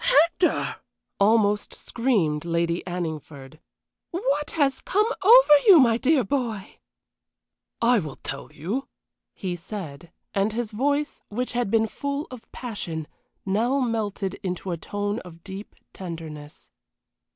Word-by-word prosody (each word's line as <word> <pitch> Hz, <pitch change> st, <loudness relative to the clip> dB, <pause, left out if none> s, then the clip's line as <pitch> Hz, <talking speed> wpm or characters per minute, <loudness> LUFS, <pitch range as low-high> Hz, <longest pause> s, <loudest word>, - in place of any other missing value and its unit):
"Hector!" 360 Hz, -7 st, +3 dB, 0.4 s
almost 210 Hz, 0 st, +3 dB
screamed 195 Hz, -, 0 dB
Lady 170 Hz, 0 st, 0 dB
Anningford. 155 Hz, -5 st, -5 dB, 0.5 s
"What 295 Hz, -4 st, -1 dB
has 275 Hz, -4 st, +2 dB
come 420 Hz, +2 st, +2 dB, 0.2 s
over 465 Hz, -3 st, +8 dB
you, 375 Hz, -5 st, +10 dB
my 235 Hz, -4 st, +5 dB
dear 270 Hz, +2 st, +3 dB
boy?" 225 Hz, -4 st, -3 dB, 1.0 s
"I 240 Hz, 0 st, +5 dB
will 150 Hz, -7 st, -6 dB
tell -, -, -7 dB
you," 205 Hz, -, -4 dB, 0.5 s
he 185 Hz, -2 st, -3 dB
said; 170 Hz, -4 st, -8 dB, 0.2 s
and 200 Hz, +2 st, +1 dB
his 235 Hz, -1 st, -2 dB
voice, 285 Hz, +6 st, 0 dB
which 245 Hz, +4 st, -2 dB
had 245 Hz, -4 st, -1 dB
been 225 Hz, +1 st, +3 dB
full 280 Hz, +6 st, -3 dB
of 250 Hz, -3 st, -11 dB
passion, 175 Hz, -10 st, -5 dB, 0.4 s
now 230 Hz, +8 st, +1 dB
melted 215 Hz, -6 st, -2 dB
into 180 Hz, 0 st, -3 dB
a -, -, 0 dB
tone 205 Hz, +5 st, -3 dB
of 170 Hz, -4 st, -13 dB
deep 195 Hz, +1 st, -8 dB, 0.2 s
tenderness. 160 Hz, -5 st, -8 dB
210 Hz, 125 wpm, -25 LUFS, 175-260 Hz, 1.0 s, you